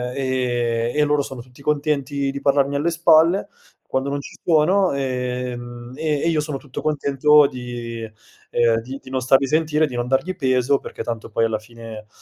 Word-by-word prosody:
e 120 Hz, -3 st, 0 dB
e 150 Hz, -, +3 dB
loro 150 Hz, -1 st, +2 dB
sono 130 Hz, -3 st, -7 dB
tutti 125 Hz, +3 st, -17 dB
contenti 140 Hz, -2 st, 0 dB
di 140 Hz, 0 st, -6 dB
parlarmi 140 Hz, 0 st, +2 dB
alle 145 Hz, +4 st, +1 dB
spalle 170 Hz, +2 st, +4 dB, 0.4 s
quando 130 Hz, +1 st, 0 dB
non 140 Hz, 0 st, -2 dB
ci -, -, -11 dB
sono, 180 Hz, +3 st, +3 dB
ehm, 125 Hz, -2 st, -4 dB
e 150 Hz, -1 st, -1 dB
e -, -, +1 dB
io 160 Hz, -2 st, +1 dB
sono 150 Hz, -2 st, -4 dB
tutto 135 Hz, -2 st, -8 dB
contento 150 Hz, 0 st, +4 dB
di 120 Hz, -3 st, -5 dB, 0.5 s
ehm, 115 Hz, -1 st, +3 dB
di 130 Hz, +4 st, -8 dB
di 130 Hz, -, -11 dB
non 130 Hz, -1 st, -1 dB
starli 135 Hz, +1 st, +4 dB
sentire, 155 Hz, +1 st, +2 dB
di 130 Hz, -4 st, -6 dB
non 120 Hz, 0 st, -2 dB
dargli 165 Hz, +8 st, 0 dB
peso 130 Hz, 0 st, +2 dB
perché -, -, -7 dB
tanto 115 Hz, -1 st, -5 dB
poi 115 Hz, +1 st, +1 dB
alla 110 Hz, -1 st, -1 dB
fine, 110 Hz, -1 st, -11 dB
135 Hz, 180 wpm, -21 LUFS, 120-150 Hz, 0.5 s, spalle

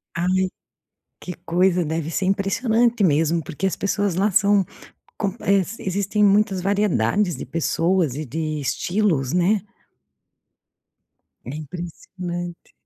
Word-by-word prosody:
Ai, 185 Hz, +2 st, +1 dB, 0.7 s
que 180 Hz, -, -6 dB
coisa, 180 Hz, +1 st, +2 dB
deve 160 Hz, 0 st, -2 dB
ser 185 Hz, -, -1 dB
impressionante 225 Hz, +4 st, +2 dB
mesmo, 165 Hz, 0 st, +2 dB
porque 175 Hz, +3 st, -3 dB
as 190 Hz, -, -1 dB
pessoas 200 Hz, -1 st, 0 dB
lá 195 Hz, +4 st, +2 dB
são 205 Hz, 0 st, +4 dB, 0.5 s
com 200 Hz, -3 st, -1 dB
eh, 195 Hz, -1 st, +3 dB
se 200 Hz, +7 st, -9 dB
existem 200 Hz, +2 st, 0 dB
muitas 200 Hz, -1 st, +3 dB
variedades 195 Hz, -, +1 dB
de -, -, -6 dB
pessoas 165 Hz, +1 st, 0 dB
e 155 Hz, +2 st, -4 dB
de 155 Hz, +2 st, -3 dB
estilos, 160 Hz, -2 st, 0 dB
né? 185 Hz, +4 st, +3 dB, 1.8 s
É 125 Hz, -, -6 dB
impressionante. 175 Hz, +2 st, -7 dB
185 Hz, 120 wpm, -22 LUFS, 165-200 Hz, 1.8 s, são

